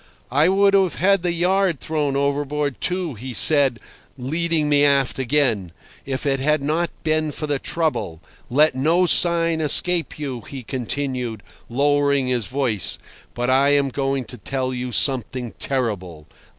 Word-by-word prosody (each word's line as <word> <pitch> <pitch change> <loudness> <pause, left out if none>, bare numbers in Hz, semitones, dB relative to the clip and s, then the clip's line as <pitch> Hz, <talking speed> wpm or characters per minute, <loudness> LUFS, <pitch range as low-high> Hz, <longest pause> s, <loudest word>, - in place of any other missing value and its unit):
I 145 +6 +3
would 200 +1 +3
have 190 -3 +3
had 195 +1 +2
the 175 0 0
yard 180 -1 +1
thrown 150 -3 -2
overboard, 140 -3 -1
too, 180 -4 -1
he 125 +2 -7
said, 140 -5 +4 0.4
leading 160 +4 -1
me 145 -1 +3
aft 140 -2 +2
again, 125 - 0 0.4
"if 135 +1 -4
it 135 -1 +1
had 150 +3 +1
not 160 +4 0
been 155 -1 0
for 150 - -5
the 145 -2 -1
trouble. 110 - -2 0.3
Let 150 +4 +3
no 160 +8 +2
sign 170 -2 +2
escape 170 +3 +2
you," 135 -5 -5
he 135 -2 -7
continued, 125 -3 -3 0.3
lowering 140 +1 +2
his 125 -4 -1
voice, 125 -8 0 0.4
"but 125 +1 0
I 140 +2 +4
am 140 -1 +2
going 135 -1 -2
to 125 - -10
tell 130 +4 -3
you 125 0 -4
something 125 -1 0
terrible. 95 - -3
140 Hz, 150 wpm, -21 LUFS, 125-155 Hz, 0.4 s, said